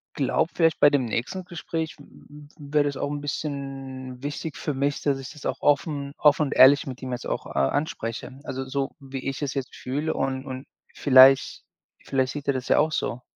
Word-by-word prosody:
glaube, 145 Hz, +4 st, +1 dB
vielleicht 165 Hz, -2 st, +2 dB
bei 145 Hz, -, +7 dB
dem 140 Hz, -3 st, +1 dB
nächsten 125 Hz, -, -3 dB
Gespräch 165 Hz, -2 st, -4 dB
w -, -, -14 dB
w 145 Hz, 0 st, -15 dB, 0.3 s
wäre 150 Hz, -1 st, +4 dB
das 140 Hz, -1 st, -2 dB
auch 140 Hz, -, -2 dB
'n 145 Hz, -, -4 dB
bisschen 135 Hz, -3 st, -5 dB
wichtig 145 Hz, +1 st, -5 dB
für 150 Hz, -, -3 dB
mich, 140 Hz, +1 st, -1 dB
dass 140 Hz, -2 st, +1 dB
ich 135 Hz, -, -8 dB
das 150 Hz, -2 st, -12 dB
auch -, -, -2 dB
offen 145 Hz, -1 st, +1 dB
offen 150 Hz, 0 st, +4 dB
und -, -, -4 dB
ehrlich 140 Hz, +2 st, +7 dB
mit 130 Hz, -1 st, -7 dB
ihm 130 Hz, -, -4 dB
jetzt 125 Hz, -, -4 dB
auch -, -, -3 dB
a 70 Hz, -1 st, 0 dB
anspreche, 130 Hz, -3 st, -4 dB
also, 135 Hz, -2 st, -4 dB
so 135 Hz, 0 st, -3 dB
wie 135 Hz, -1 st, -7 dB
ich 135 Hz, -, -5 dB
es 140 Hz, -1 st, -2 dB
jetzt 135 Hz, -2 st, -4 dB
fühle 145 Hz, +5 st, -3 dB
und 135 Hz, 0 st, -2 dB
und 130 Hz, 0 st, -7 dB, 0.3 s
vielleicht 135 Hz, -1 st, +6 dB, 0.4 s
vielleicht 130 Hz, -1 st, 0 dB
sieht 145 Hz, -1 st, -7 dB
er 140 Hz, -, +3 dB
das 130 Hz, -1 st, -4 dB
ja -, -, +5 dB
auch 155 Hz, +1 st, +2 dB
so. 125 Hz, -4 st, -2 dB
140 Hz, 210 wpm, -25 LUFS, 130-145 Hz, 0.4 s, bei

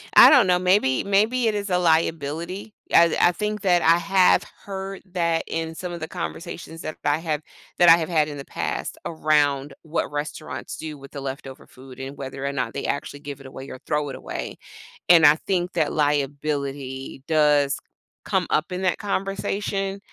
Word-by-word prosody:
I -, -, +11 dB
don't -, -, +7 dB
know, 180 Hz, 0 st, +3 dB
maybe 180 Hz, -8 st, +2 dB
maybe 220 Hz, +5 st, +2 dB
it 215 Hz, -, +1 dB
is 200 Hz, -1 st, -3 dB
a 180 Hz, -, +3 dB
liability. 165 Hz, +4 st, 0 dB, 0.2 s
I 170 Hz, -1 st, +6 dB
I 175 Hz, -, +5 dB
think 210 Hz, +3 st, -3 dB
that 175 Hz, -3 st, +3 dB
I 165 Hz, +1 st, +5 dB
have 190 Hz, +1 st, +4 dB, 0.2 s
heard 195 Hz, 0 st, -6 dB
that 170 Hz, -2 st, +1 dB
in 165 Hz, 0 st, -3 dB
some 180 Hz, 0 st, -5 dB
of 170 Hz, -, -6 dB
the 160 Hz, -, -3 dB
conversations 165 Hz, -1 st, -6 dB
that 155 Hz, -, -6 dB
I've 150 Hz, +3 st, +1 dB
have 155 Hz, -2 st, -1 dB, 0.4 s
that 175 Hz, -1 st, +7 dB
I 165 Hz, -, +9 dB
have 165 Hz, +1 st, -3 dB
had 155 Hz, -3 st, +2 dB
in 145 Hz, -1 st, -7 dB
the 140 Hz, -, -8 dB
past, -, -, -4 dB
around 145 Hz, -3 st, +1 dB
what 160 Hz, -1 st, -3 dB
restaurants 145 Hz, -3 st, -5 dB
do 155 Hz, -2 st, -7 dB
with 140 Hz, -, -13 dB
the 140 Hz, -, -7 dB
leftover 135 Hz, 0 st, -7 dB
food 130 Hz, 0 st, -14 dB
and 135 Hz, +2 st, -6 dB
whether 135 Hz, 0 st, -6 dB
or 140 Hz, -, 0 dB
not 125 Hz, -5 st, -3 dB
they 140 Hz, -, -4 dB
actually 140 Hz, 0 st, -3 dB
give 145 Hz, -1 st, -7 dB
it 135 Hz, -, -11 dB
away 130 Hz, +1 st, -9 dB
or 130 Hz, -, -8 dB
throw 150 Hz, -1 st, 0 dB
it 130 Hz, -, -6 dB
away, -, -, -6 dB, 0.5 s
and 170 Hz, -3 st, +8 dB
I 150 Hz, -, +8 dB
think 180 Hz, -2 st, 0 dB
that 160 Hz, -4 st, +1 dB
liability 140 Hz, -2 st, -2 dB
does 150 Hz, -3 st, +3 dB, 0.4 s
come -, -, 0 dB
up 165 Hz, +5 st, 0 dB
in 185 Hz, -, -3 dB
that 185 Hz, -, +1 dB
conversation, 195 Hz, 0 st, -2 dB
160 Hz, 190 wpm, -23 LUFS, 140-180 Hz, 0.5 s, I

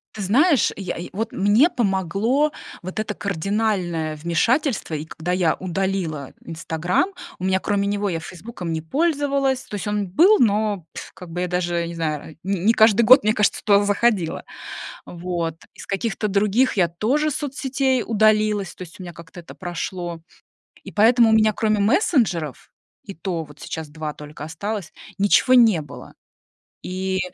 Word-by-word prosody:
Ты 215 Hz, -, -5 dB
знаешь, 270 Hz, -, +3 dB
я 195 Hz, -2 st, -4 dB
я 170 Hz, -, -6 dB
вот 220 Hz, +4 st, -4 dB
мне 210 Hz, -, +4 dB
помогло 220 Hz, -, 0 dB, 0.3 s
вот 185 Hz, +4 st, -6 dB
это 215 Hz, -1 st, -4 dB
кардинальное 195 Hz, -4 st, -1 dB
вмешательство, 195 Hz, -, 0 dB
и 150 Hz, -1 st, -2 dB
когда 160 Hz, +2 st, -4 dB
я 180 Hz, -3 st, +2 dB
удалила 185 Hz, -6 st, -3 dB
"Инстаграм", 165 Hz, -, -1 dB, 0.3 s
у -, -, -9 dB
меня 190 Hz, 0 st, +2 dB
кроме 200 Hz, 0 st, 0 dB
него 205 Hz, 0 st, -1 dB
я 165 Hz, -4 st, -2 dB
"Фейсбуком" 180 Hz, -1 st, -7 dB
не 160 Hz, -, -2 dB
пользовалась, 275 Hz, -, 0 dB
то -, -, -7 dB
есть 205 Hz, +1 st, -4 dB
он 205 Hz, -1 st, -1 dB
был, 350 Hz, -, +5 dB
но 210 Hz, -5 st, +1 dB
я, -, -, -5 dB
как 180 Hz, -3 st, -11 dB
бы, 175 Hz, +2 st, -2 dB
даже 175 Hz, -1 st, -1 dB
я 170 Hz, -, -2 dB
не 170 Hz, -, -7 dB
знаю, 155 Hz, -1 st, -4 dB
не 195 Hz, +3 st, +2 dB
каждый 220 Hz, -1 st, +5 dB
год, 255 Hz, +3 st, +7 dB
мне 215 Hz, +1 st, +3 dB
кажется, 210 Hz, -3 st, +1 dB
туда 205 Hz, -1 st, +4 dB
заходила, 205 Hz, -4 st, +1 dB, 0.6 s
вот. 170 Hz, -2 st, -4 dB, 0.2 s
Из -, -, -10 dB
каких-то 210 Hz, +1 st, -2 dB
других 210 Hz, +5 st, +2 dB
я 175 Hz, -3 st, +4 dB
тоже 250 Hz, -, 0 dB
соцсетей 270 Hz, -3 st, -1 dB
удалилась, 215 Hz, -3 st, +2 dB
то -, -, -16 dB
есть 180 Hz, +1 st, -10 dB
у -, -, -7 dB
меня 175 Hz, -1 st, -8 dB
как-то 170 Hz, +3 st, -12 dB
это 170 Hz, -, -11 dB
прошло. 175 Hz, -1 st, -5 dB, 0.6 s
И -, -, -10 dB
поэтому 230 Hz, +2 st, +5 dB
у -, -, +4 dB
меня 215 Hz, -1 st, +5 dB
кроме 215 Hz, 0 st, 0 dB
мессенджеров, 200 Hz, -, +1 dB, 0.3 s
и 200 Hz, -, -8 dB
то 170 Hz, -1 st, -4 dB
вот 150 Hz, -1 st, -15 dB
сейчас 160 Hz, -2 st, -6 dB
2 155 Hz, 0 st, -5 dB
только 150 Hz, 0 st, -9 dB
осталось, 200 Hz, +4 st, -5 dB, 0.2 s
ничего 205 Hz, +6 st, +4 dB
не 225 Hz, -9 st, +6 dB
было. 145 Hz, -, -11 dB, 0.7 s
И 185 Hz, +1 st, -2 dB
195 Hz, 165 wpm, -22 LUFS, 170-220 Hz, 0.7 s, год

